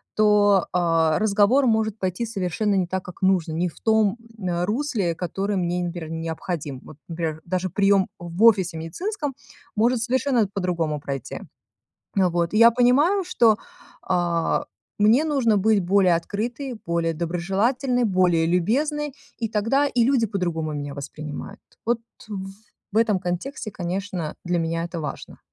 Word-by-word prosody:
то, 205 -3 +4
а, 165 -3 +2
разговор 215 +6 +3
может 220 -1 +1
пойти 185 +5 -2
совершенно 200 -1 -1
не 185 -2 +1
так, 190 +1 -3
как 180 - -11
нужно, 180 -4 +2
не 175 +3 0
в - - -17
том, 220 -1 +2 0.2
э, 175 -3 -1
русле, 210 - -1
которое 195 +4 -2
мне, 175 0 -1
например, 170 -2 -5
необходим. 160 -3 -4
Вот, 150 - -12
например, 165 -2 -3
даже 185 +1 -1
прием 195 +1 +3
в 175 +4 -3
офисе 190 -7 +5
медицинском 290 - -4 0.4
может 235 +3 +2
совершенно 250 -3 +1
по-другому 170 -6 -1
пройти. 135 -3 -5 0.8
А 185 -2 +4
вот, 170 0 0
и - - +3
я 230 +1 +8
понимаю, 285 +11 +3
что, 230 - +3 0.4
а, 175 -2 0 0.4
мне 225 +8 +5
нужно 255 -9 +2
быть 210 +1 +3
более 185 -1 +3
открытой, 235 +9 -4
более 170 -1 0
доброжелательной, 195 - 0
более 180 -5 +3
любезной, 275 - 0 0.2
и 225 -2 -2
тогда 230 +7 +1
и 245 -3 +1
люди 255 -3 +3
по-другому 175 -6 -2
меня 145 -1 -5
воспринимают. 150 +1 -7 0.3
Вот 235 0 +1 0.9
в - - -4
этом 220 -4 +3
контексте, 190 +7 -4
конечно, 180 -3 -4
для 175 0 0
меня 165 0 -1
это 170 0 -5
важно. 150 - -7
190 Hz, 145 wpm, -23 LUFS, 170-225 Hz, 0.9 s, я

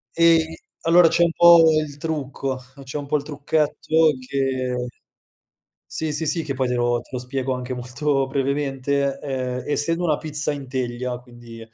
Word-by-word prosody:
E 165 -1 +3 0.2
allora 170 +1 +6
c'è 170 +1 +3
un 170 - +3
po' 170 0 +7 0.2
il 145 -2 -7
trucco 140 -4 -3 0.3
c'è 135 +2 -6
un 145 - -5
po' 150 - +2
il 145 - -5
trucchetto 155 +2 +1
che 130 -2 -1 1.0
sì, 155 -1 -3
sì, 160 +2 -2
sì, 165 +2 0
che 140 -3 -4
poi 130 -1 -1
te 125 - 0
lo 120 0 +1
te 120 - -19
lo 125 - -2
spiego 130 +1 -3
anche 125 0 -5
molto 135 +3 -1
brevemente. 140 0 -1
Ehm, 130 -2 -3
essendo 165 +4 0
una 155 -4 +2
pizza 150 -1 -1
in 140 -2 -7
teglia, 125 -1 -3
quindi, 120 -2 -13
140 Hz, 170 wpm, -22 LUFS, 125-155 Hz, 1.0 s, po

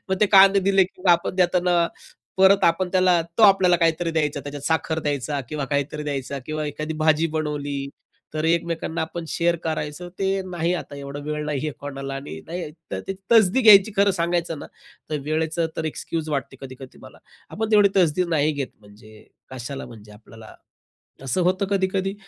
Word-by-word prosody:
मग 190 - +1
ते 210 - +5
कांदे 195 +1 +7
दिले, 195 0 +3
की 180 0 -14
आपण 170 +1 +2
देताना 180 -1 +2 0.6
परत 190 +1 +5
आपण 180 +2 +2
त्याला, 185 -2 +4 0.2
तो 225 - +4
आपल्याला 190 -3 +6
काहीतरी 165 0 +1
द्यायचा; 150 -3 -1
त्याच्यात 145 0 -8
साखर 160 0 0
द्यायचा 145 -1 -2
किंवा 150 -2 -3
काहीतरी 145 +1 -2
द्यायचा 140 -1 -4
किंवा 155 0 -3
एखादी 155 +2 -5
भाजी 155 +1 +3
बनवली, 145 -2 -3 0.5
तर 155 0 -2
एकमेकांना 165 0 -1
आपण 165 +1 -5
शेअर 170 0 +1
करायचं. 155 +2 -4
ते 195 0 0
नाही 170 -1 -1
आता; 150 -4 -6
एवढा 140 0 -7
वेळ 150 0 -3
नाही 150 -2 -2
आहे - - -2
कोणाला. 135 -1 -6
आणि 135 - -7
नाही 170 -1 -5 0.2
तर 95 - -2
ती - - 0 0.2
तसदी 220 +1 +5
घ्यायची. 210 -2 +7
खरं 200 +1 +4
सांगायचं 170 -2 -1
ना, - - -8 0.4
तर 150 - -1
वेळेचं 160 +2 -1
तर 160 - -3
एक्सक्यूज 155 +1 -4
वाटते 135 -1 -3
कधी-कधी 130 -1 -11
मला. - - -14 0.3
आपण 220 +1 -3
तेवढी 205 -1 +6
तसदी 180 -1 +3
नाही 155 -1 +1
घेत 140 -3 -4
म्हणजे, 105 +1 -17 0.3
कशाला 130 +2 -6
म्हणजे 105 -2 -13
आपल्याला? 110 +1 -14 0.7
असं 135 +8 -1
होतं 185 +2 0
कधी-कधी. 195 0 0
160 Hz, 175 wpm, -23 LUFS, 145-180 Hz, 0.7 s, कांदे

